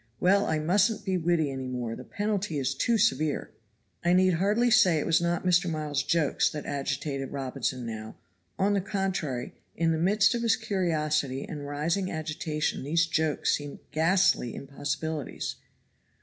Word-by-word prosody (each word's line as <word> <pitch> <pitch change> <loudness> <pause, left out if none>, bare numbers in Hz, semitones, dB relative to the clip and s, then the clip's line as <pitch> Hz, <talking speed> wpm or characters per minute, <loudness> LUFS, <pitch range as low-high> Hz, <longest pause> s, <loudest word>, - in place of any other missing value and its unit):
Well, 200 +2 +3
I 155 - +1
mustn't 190 +8 +2
be 190 -2 0
witty 165 -4 +1
any 130 -1 -5
more, 120 -3 -3
the - - -9
penalty 205 -5 -2
is 135 0 0
too 230 - +1
severe." 155 - +1 0.5
I 175 +1 +3
need 185 0 +4
hardly 210 +8 +2
say 180 -6 +5
it 150 - -1
was 165 +1 +3
not 170 +1 -1
Mr. 175 0 +3
Miles's 150 -3 -1
jokes 155 +1 +2
that 150 -2 -6
agitated 140 -1 -3
Robinson 130 -2 -3
now; 110 -1 -6 0.4
on 200 +1 +2
the 200 - +1
contrary, 185 -10 -2 0.2
in 165 0 +1
the 160 - 0
midst 200 +6 +3
of 235 - -1
his 230 -1 +3
curiosity 155 -9 -1
and 145 -3 -6
rising 165 +7 -1
agitation 155 -1 -2
these 165 +4 +2
jokes 160 -2 +1
seemed 145 -1 -7
ghastly 165 - +2
impossibilities. 145 +2 -4
160 Hz, 160 wpm, -28 LUFS, 145-185 Hz, 0.5 s, say